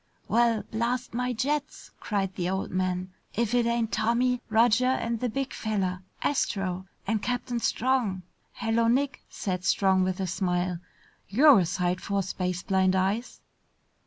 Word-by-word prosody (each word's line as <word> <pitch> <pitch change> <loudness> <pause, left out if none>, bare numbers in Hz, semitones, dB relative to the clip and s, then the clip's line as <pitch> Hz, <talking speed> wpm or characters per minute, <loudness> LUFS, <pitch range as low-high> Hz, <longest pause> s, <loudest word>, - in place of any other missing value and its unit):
"Well, 235 -2 +2
blast 235 +3 -1
my 250 +1 -1
jets!" 285 +5 -2
cried 195 -3 -1
the 180 -1 -2
old 190 +1 -2
man. 185 0 -1 0.2
"If 235 +1 0
it 240 -1 +3
ain't 235 -1 0
Tommy, 245 +2 +1
Roger, 235 +3 +4
and 235 -3 0
the 250 - -1
big 270 +4 -3
fella, 195 -4 -2 0.2
Astro! 190 -8 -1 0.2
And 215 +1 0
Captain 245 0 -2
Strong!" 230 -7 0 0.3
"Hello, 230 0 +1
Nick!" 270 +3 +1
said 180 -2 -3
Strong 190 -1 +3
with 185 0 -1
a 190 - 0
smile. 180 -1 -1 0.5
"You're 270 +4 +7
a 175 - +1
sight 180 +1 -1
for 200 -1 -1
space 180 -1 -3
blind 190 -1 +2
eyes!" 195 +6 -1
215 Hz, 150 wpm, -27 LUFS, 185-240 Hz, 0.5 s, You're